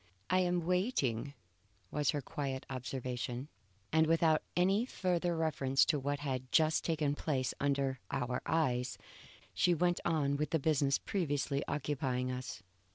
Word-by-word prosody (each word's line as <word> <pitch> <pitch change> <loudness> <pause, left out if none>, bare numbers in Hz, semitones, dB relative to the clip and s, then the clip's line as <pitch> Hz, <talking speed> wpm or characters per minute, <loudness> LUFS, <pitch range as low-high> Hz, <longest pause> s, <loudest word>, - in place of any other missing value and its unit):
"I 185 - +4
am 175 -2 +1
waiting," 145 - 0 0.6
was 150 0 +1
her 145 - +1
quiet 135 -1 -4
observation, 125 +1 -4 0.4
and 160 0 +5
without 160 -1 +4 0.2
any 195 +5 +3
further 180 -7 0
reference 140 -4 +2
to 150 - +1
what 145 +1 -2
had 130 -3 -3
just 155 -1 +3
taken 155 -3 +1
place 135 -4 -1
under 140 -2 0
our 125 -1 -1
eyes, 130 -6 +1 0.6
she 180 -1 +3
went 175 +2 +2
on 145 -4 +1
with 150 +1 -1
the 165 - +2
business 140 -2 +2
previously 145 -6 -1
occupying 135 -3 -1
us. 125 -5 -6
145 Hz, 140 wpm, -34 LUFS, 130-165 Hz, 0.6 s, and